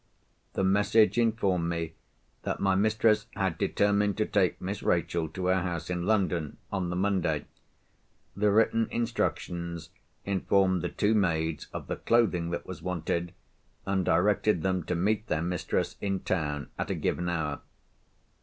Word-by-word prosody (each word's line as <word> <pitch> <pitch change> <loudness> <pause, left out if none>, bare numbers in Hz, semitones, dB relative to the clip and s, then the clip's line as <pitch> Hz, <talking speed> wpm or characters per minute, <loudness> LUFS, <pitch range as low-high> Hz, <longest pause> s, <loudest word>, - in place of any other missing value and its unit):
The - - 0
message 105 +4 +4
informed 100 -7 +1
me 85 -1 -3 0.5
that - - -3
my 95 -1 +2
mistress 105 +2 +3
had 95 -4 -1
determined 100 0 +2
to 110 - +2
take 95 -5 +1
Miss 95 +3 -4
Rachel 85 -1 0
to 95 +2 -5
her 95 0 +3
house 85 -1 -3
in 90 0 -2
London, 90 -8 +1
on 95 -3 -1
the 90 - -2
Monday. 90 -5 0 0.9
The 105 +1 +2
written 115 +1 +3
instructions 85 -7 -2 0.3
informed 95 -1 +2
the - - -2
two 105 +2 +1
maids 80 -6 0
of - - -6
the - - -4
clothing 95 -8 +2
that 85 0 -4
was 95 - -8
wanted, 85 -1 -2 0.5
and 95 -1 +1
directed 95 +1 +2
them 95 -1 +1
to 90 - -1
meet 105 +5 0
their 80 -5 0
mistresses 90 0 -1
in 95 -2 -1
town 75 -5 -2
at - - -2
a - - 0
given 90 0 -1
hour. 75 -4 -2
95 Hz, 155 wpm, -29 LUFS, 85-100 Hz, 0.9 s, message